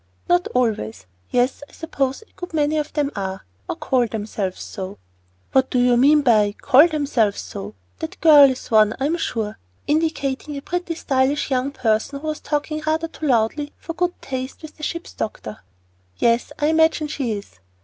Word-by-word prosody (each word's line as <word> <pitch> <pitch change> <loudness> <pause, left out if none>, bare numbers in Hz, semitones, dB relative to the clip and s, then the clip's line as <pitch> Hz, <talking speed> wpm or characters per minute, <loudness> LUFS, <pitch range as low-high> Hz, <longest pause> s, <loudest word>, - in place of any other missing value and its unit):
"Not 175 0 +3
always. 215 - 0 0.2
Yes, 250 +3 +1
I - - -21
suppose 275 0 -2
a - - -25
good 355 -2 -7
many 305 0 +2
of 300 - -3
them 295 -2 0
are 190 -1 -4 0.2
or - - -1
call 250 -2 +1
themselves 205 -3 -4
so." 190 -2 -7 0.5
"What 265 0 +3
do - - 0
you 245 0 +4
mean 290 +4 +5
by 215 -5 +4
'call 285 +4 +6
themselves 280 -10 0
so'? 100 +2 -7 0.2
That 160 - -6
girl 295 -4 +8
is 260 -2 -6
one, 215 -1 +5
I 270 - 0
am 325 +4 +1
sure," 220 -9 -3 0.3
indicating 295 -2 -1
a - - -5
pretty, 355 -1 -3
stylish 275 -1 0
young 260 +1 +1
person, 255 +1 0
who 305 - -10
was 305 - -3
talking 305 +1 -2
rather 320 +1 0
too 315 - -5
loudly 260 +4 +1
for 330 - -7
good 350 +2 -1
taste 260 +2 -5
with 310 - -10
the - - -15
ship's 335 +3 -4
doctor. 110 - -5 0.6
"Yes, 235 +4 +2
I 295 - 0
imagine 320 0 +3
she 270 -6 -2
is." 200 - -8
270 Hz, 180 wpm, -22 LUFS, 225-305 Hz, 0.6 s, girl